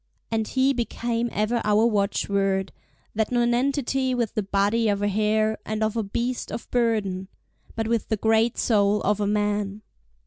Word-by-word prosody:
And 220 -1 0
he 265 +1 +2
became 235 -1 -2
ever 220 +3 0
our 210 +1 +3
watchword, 200 -2 0 0.4
that 220 +1 -1
nonentity 255 +2 +1
with 235 -4 -1
the 215 - 0
body 205 +3 +1
of 200 0 0
a - - +2
hare, 215 +1 +1
and 215 0 -2
of 215 0 0
a 230 - +1
beast 235 +5 -3
of - - -6
burden—but 220 -1 -2
with 230 -2 0
the 220 - 0
great 225 +2 +2
soul 205 -2 +2
of 210 +1 +1
a 205 - 0
man! 205 0 -1
220 Hz, 160 wpm, -24 LUFS, 205-235 Hz, 0.4 s, our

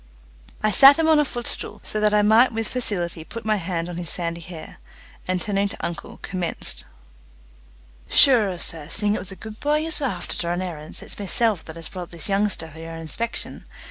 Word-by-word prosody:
I 215 - +3
sat 275 +6 +9
him 325 -1 +2
on 315 -1 +5
a - - +4
footstool, 240 -3 -4
so 215 - -3
that 210 0 +3
I 210 0 +3
might 225 +5 +5
with 225 -1 -1
facility 180 -10 0
put 230 +7 -9
my 215 -1 +2
hand 170 -2 -3
on 175 -1 -6
his 175 -2 -4
sandy 170 -1 -3
hair, 165 -2 -10 0.5
and 185 0 0
turning 200 0 0
to - - -5
uncle, 170 - -6
commenced: 180 -3 -4 1.2
"Shure, 220 -10 +6
sir, 160 -3 +1
seeing 205 +3 +3
it - - -1
was 185 +1 -6
a - - -8
good 220 +2 -10
bhoy 300 +1 +1
yez 320 -1 0
were 280 - 0
afther 180 -7 -4
to 170 - -2
run 175 +1 -1
errants, 160 -4 -7
it's - - -6
meself 205 -1 +1
that 160 - -9
has 165 -1 -7
brought 180 -2 -7
this 170 +3 -1
youngsther 195 -5 0
for 160 - -13
yer 165 0 -8
inspection. 165 +9 -4
195 Hz, 205 wpm, -23 LUFS, 170-225 Hz, 1.2 s, sat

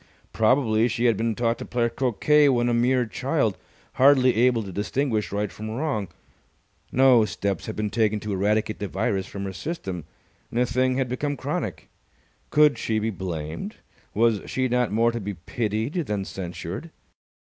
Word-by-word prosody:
Probably 115 -1 +3
she 120 +1 -1
had 115 -2 +4
been 115 +2 -1
taught 115 0 0
to - - -6
play 120 -1 0
croquet 135 +5 +3
when 120 -2 +2
a - - +1
mere 125 +1 +2
child, 110 - 0 0.5
hardly 130 -2 +6
able 120 0 +3
to 95 - -7
distinguish 110 +3 -1
right 105 0 -2
from 110 +1 -7
wrong. 110 -4 -2 0.8
No 130 -3 +6
steps 100 -1 -3
had 110 - -4
been 105 -1 -2
taken 110 -1 +1
to 105 -1 -3
eradicate 105 +2 0
the 100 - -3
virus 95 0 -1
from 100 - -6
her 95 -1 -4
system, 95 - -5 0.4
and 120 - -2
the 125 - +4
thing 130 +2 +1
had 135 -2 0
become 145 +3 -2
chronic. - - -4 0.6
Could 150 -1 +4
she 110 - -1
be 110 +1 0
blamed? 85 -4 -5 0.4
Was 110 -1 +3
she 130 0 0
not 125 -2 +1
more 115 +2 +3
to 120 - -4
be 100 0 -4
pitied 110 - -2
than 105 - -2
censured? 95 - -6
115 Hz, 170 wpm, -25 LUFS, 105-125 Hz, 0.8 s, hardly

